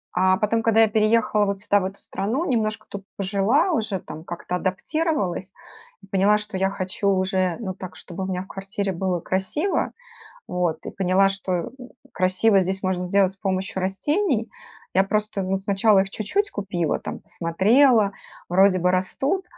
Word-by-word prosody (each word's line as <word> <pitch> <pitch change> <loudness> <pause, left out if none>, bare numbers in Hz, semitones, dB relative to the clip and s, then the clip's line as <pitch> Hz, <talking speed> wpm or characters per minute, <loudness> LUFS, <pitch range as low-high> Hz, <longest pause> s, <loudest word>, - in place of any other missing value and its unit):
А 185 +1 +4
потом, 225 +1 +1
когда 225 0 +4
я 225 - +6
переехала 215 0 +2
вот 200 -1 -2
сюда 205 +1 +2
в 190 - -3
эту 195 +1 -6
страну, 230 - -2
немножко 215 -5 -1
тут 200 -1 -7
пожила 200 - +2
уже, 220 - -1
там 160 - -9
как-то 175 +1 -5
адаптировалась, 195 - -2 0.5
и - - -15
поняла, 195 +2 +3
что 210 -1 -7
я 190 +1 +1
хочу 195 +1 -2
уже, 185 -2 +1
ну 195 -5 -4
так, 185 -1 -9
чтобы 185 +1 -7
у - - -3
меня 185 -1 -2
в - - -17
квартире 195 +1 -4
было 180 0 -1
красиво, 190 - -1 0.6
вот. 180 -3 -1
И - - -5
поняла, 190 +1 +3
что, 195 -1 -4
м, 175 -2 -2 0.4
красиво 185 +3 +3
здесь 190 +1 -2
можно 185 -1 -1
сделать 190 +1 +2
с - - -16
помощью 190 -1 -2
растений. 235 - 0 0.5
Я 190 - +4
просто, 210 0 -1
ну, 190 +1 -1
сначала 200 +1 +3
их 195 0 -1
чуть-чуть 400 - -1
купила, 180 -6 -2
там - - -7
посмотрела, 210 +5 +3 0.4
вроде 185 +1 +4
бы 180 +1 +3
растут, 270 - 0
195 Hz, 170 wpm, -23 LUFS, 185-215 Hz, 0.6 s, я